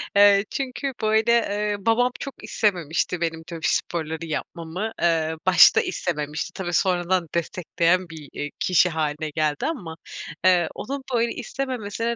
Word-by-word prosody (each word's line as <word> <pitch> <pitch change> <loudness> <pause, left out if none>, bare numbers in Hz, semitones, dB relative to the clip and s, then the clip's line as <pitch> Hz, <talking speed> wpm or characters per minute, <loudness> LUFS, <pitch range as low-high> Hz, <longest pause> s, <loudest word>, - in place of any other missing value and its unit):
Eee, 200 0 +6
çünkü, 270 +1 -3
böyle, 220 +1 +3
eee, 210 -3 +1
babam 230 +4 +2
çok 275 -5 -8
istememişti 180 -5 0
benim 165 -1 -2
tabii 165 -2 -3
sporları 160 -1 -2
yapmamı, 170 +5 -4
eee, 160 -2 +2
başta 180 -3 +7
istememişti. 150 -3 -3
Tabii, 175 -2 -4
sonradan 180 -1 +1
destekleyen 170 +1 0
bir, 155 -3 -10
eee, 145 - -4
kişi 180 0 +4
hâline 155 -1 -2
geldi 150 -1 -1
ama, 180 - -4 0.5
eee, 180 -2 +5
onun 275 0 -5
böyle 235 0 +2
istememesine 235 -3 -3
180 Hz, 135 wpm, -24 LUFS, 160-215 Hz, 0.5 s, başta